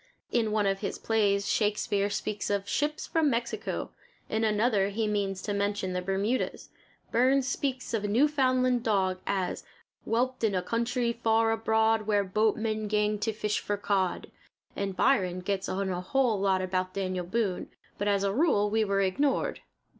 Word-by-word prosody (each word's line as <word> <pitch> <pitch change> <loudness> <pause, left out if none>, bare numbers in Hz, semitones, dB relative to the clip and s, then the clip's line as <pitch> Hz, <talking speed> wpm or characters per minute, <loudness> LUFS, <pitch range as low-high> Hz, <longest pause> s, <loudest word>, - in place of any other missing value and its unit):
In 225 -3 +1
one 210 -1 +1
of 195 0 +1
his 200 - -3
plays 200 -3 +1
Shakespeare 205 -1 +1
speaks 205 0 -3
of 200 -1 -1
ships 300 +7 -1
from 320 -3 +2
Mexico; 235 -2 -3 0.4
in 220 +1 0
another 210 -2 +2
he 220 +2 -1
means 195 -2 -1
to 205 - -2
mention 200 -2 -1
the 180 - -1
Bermudas. 195 +7 -1 0.4
Burns 260 +3 +3
speaks 255 -1 -2
of 220 -2 0
a - - 0
Newfoundland 255 0 +2
dog 190 -5 +1
as 190 -2 -1 0.4
"Whelped 250 +2 -1
in 210 -3 +2
a 180 - 0
country 235 +3 0
far 225 -1 +2
abroad 220 -1 +2
Where 205 -1 +3
boatmen 215 +2 0
gang 210 0 +1
to 220 +2 0
fish 210 -1 -1
for 205 - -2
cod," 195 -3 -1 0.4
and 195 -1 -3
Byron 185 -8 +2
gets 195 +1 -2
in 195 +1 -1
a 180 0 -2
whole 230 +2 +1
lot 190 -1 +2
about 185 0 -2
Daniel 185 -2 -2
Boone; 205 -2 -1 0.3
but 205 - -1
as 200 -1 +2
a 195 -1 +1
rule 210 -7 +2
we 220 0 +2
were 195 -1 +1
ignored. 260 +9 0
210 Hz, 170 wpm, -28 LUFS, 195-230 Hz, 0.4 s, Burns